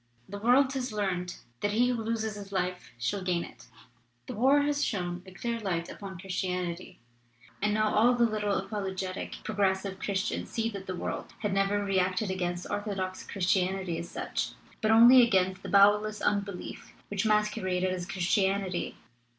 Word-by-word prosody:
The 200 +1 -7
world 260 +5 +4
has 260 -2 -2
learned 185 -4 -2 0.2
that 205 0 0
he 245 +3 +3
who 240 -2 -1
loses 220 -1 -2
his 200 -1 -9
life 180 -1 -2
shall 120 +12 -1
gain 180 -2 0
it. - - -13 0.6
"The - - -6
war 270 +6 +4
has 290 0 +1
thrown 180 -3 -2
a - - -10
clear 230 +4 -3
light 175 -5 -2
upon 195 -2 -8
Chris 185 +1 -3
tianity, 180 -1 -3 0.7
and 210 - +2
now 215 0 +1
all 240 +4 +5
the 240 -1 +4
little 210 -2 0
apologetic 190 -2 -4
'pro 215 - -4
gressive* 190 -1 0
Christians 200 +1 -2
see 225 0 -1
that 195 -2 -8
the 185 - -3
world - - -5
had 210 -3 -1
never 195 +1 +1
reacted 190 +1 +1
against 175 -1 -2
orthodox 195 -3 -3
Christianity 185 -2 0
as 170 +1 -6
such, - - -3 0.3
but 220 - +1
only 235 +3 +9
against 190 -5 +2
the - - -7
bowelless 210 +1 +5
unbelief 200 -2 -3 0.2
which 205 0 -1
mas 210 0 +3
queraded 185 -1 -1
as 180 -1 -4
Christianity. 190 0 0
195 Hz, 170 wpm, -29 LUFS, 185-215 Hz, 0.7 s, only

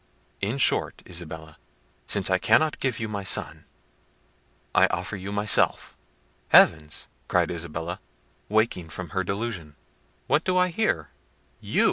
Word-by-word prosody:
In 105 +7 -1
short, 135 - +1
Isabella, 80 -3 -8 0.5
since 95 -2 +2
I 95 - +3
cannot 150 +10 +3
give 130 -5 -1
you 115 - -3
my 100 -2 -4
son, 95 - 0 1.1
I - - +5
offer - - -3
you 100 0 -6
myself." 105 0 +1 0.5
"Heavens!" 75 -1 +4 0.2
cried - - +1
Isabella, 85 +1 -5 0.5
waking 105 -6 0
from 90 +2 -7
her 95 -1 -1
delusion, 95 -6 -4 0.5
"what 155 - +2
do 185 -1 +1
I 180 0 +3
hear? 215 +5 -1 0.5
You! - - -2
100 Hz, 130 wpm, -25 LUFS, 85-115 Hz, 1.1 s, I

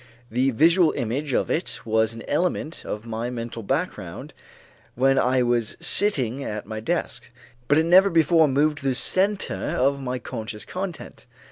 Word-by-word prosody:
The 130 +4 +2
visual 165 +7 +4
image 135 +6 -3
of - - 0
it 170 - -2
was 110 0 +2
an 115 - -9
element 165 0 -1
of 105 +2 -5
my 115 +1 -4
mental 115 -1 -6
background, 100 - -4 0.6
when 135 +2 +3
I 125 0 +2
was 120 -2 0
sitting 140 - +1
at 105 -3 -5
my 110 +1 -6
desk, 125 -3 -3 0.4
but 145 - +4
it 160 - +3
never 185 +4 +6
before 165 -1 +4
moved 150 +2 +1
to 140 - -11
the 130 - +1
center 195 +9 +1 0.2
of 140 +2 +1
my 130 -1 -3
conscious 110 -3 -7
content. 185 -2 -7
135 Hz, 160 wpm, -24 LUFS, 115-165 Hz, 0.6 s, never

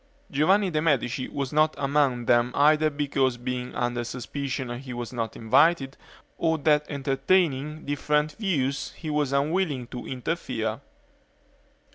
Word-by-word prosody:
Giovanni 185 +7 +3
de' 155 -1 0
Medici 135 -5 0
was 140 -1 -4
not 155 +1 +3
among 140 -4 +1
them 120 +1 +3
either 155 +1 +4
because 140 -3 0
being 125 0 -4
under 120 -1 -1
suspicion 130 0 -4
he 130 -1 -8
was 120 0 -5
not 115 -2 -3
invited 135 +4 +3 0.4
or 160 -1 +2
that 150 0 +2
entertaining 150 +1 0
different 150 +1 0
views 145 - -1
he 155 -3 -6
was 150 -2 0
unwilling 145 -1 0
to 125 - -7
interfere. 125 -4 -3
140 Hz, 130 wpm, -26 LUFS, 125-155 Hz, 0.4 s, either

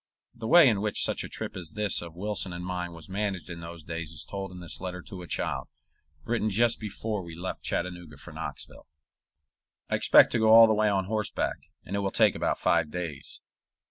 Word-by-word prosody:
The 115 -2 -6
way 170 +2 +8
in 105 -5 +2
which 105 -1 0
such - - 0
a - - -7
trip - - -5
as 85 -4 -7
this 105 -2 +2
of 85 -1 -9
Wilson 100 -1 -2
and 90 +1 -6
mine 90 -1 -3
was 85 -2 -9
managed 95 -3 -3
in 85 - -7
those 85 -1 -8
days 85 0 -5
is 75 -2 -3
told 95 +1 -5
in 90 - -9
this 85 0 -4
letter 90 -1 -5
to 95 - -9
a 90 - -9
child, - - -2 0.6
written 115 -2 0
just 115 +3 +2
before 105 0 -4
we 85 -2 -9
left 90 +3 -5
Chattanooga 85 -4 -4
for - - -11
Knoxville: - - -7 1.0
I - - +3
expect - - +6
to 115 - +1
go 110 0 +4
all 115 +1 +10
the 110 - +3
way 105 0 +3
on 95 -2 +1
horseback, 105 +1 -2 0.2
and 95 - -4
it - - 0
will 100 -1 0
take - - +4
about - - -1
five 75 - +2
days. 80 -4 -6
95 Hz, 215 wpm, -28 LUFS, 85-105 Hz, 1.0 s, all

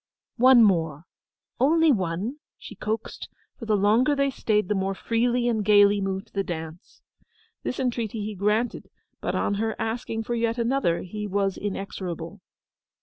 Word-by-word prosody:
'One 250 -1 +7
more—only 205 - 0
one!' 195 - -1 0.2
she - - -10
coaxed, 220 +1 -5 0.3
for 230 - -7
the 215 -1 +3
longer 225 +8 +3
they 275 0 +1
stayed 210 -6 0
the 210 - +1
more 195 0 -1
freely 240 +3 0
and 220 -3 0
gaily 205 0 +5
moved 195 +2 -4
the 195 - 0
dance. 160 -1 -8 0.6
This 250 - -4
entreaty 230 -4 -2
he 215 - -4
granted; 210 +5 -1 0.3
but - - -2
on - - 0
her 225 -1 -1
asking 225 0 -3
for 240 - -3
yet 230 0 0
another, 235 -7 0
he 210 +3 -5
was 195 -1 0
inexorable. 190 -2 -5
210 Hz, 145 wpm, -25 LUFS, 195-235 Hz, 0.6 s, One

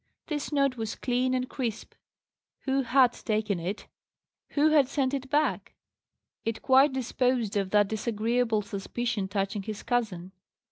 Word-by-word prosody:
This 300 -2 -3
note 275 -3 +2
was 220 -1 -3
clean 255 +1 0
and 255 0 -1
crisp. 235 -5 -4 0.7
Who 270 0 +1
had 255 -1 +4
taken 215 -4 -1
it? 185 +5 -4 0.7
Who 300 +1 +4
had 290 -4 +5
sent 275 -2 0
it 270 -1 -3
back? 300 +2 0 0.7
It 225 0 -3
quite 270 +2 +5
disposed 250 -3 0
of 195 -2 0
that 205 0 +4
disagreeable 225 0 0
suspicion 205 +2 -3
touching 200 +1 -2
his 210 +1 -6
cousin. 205 -7 -1
240 Hz, 140 wpm, -28 LUFS, 210-265 Hz, 0.7 s, had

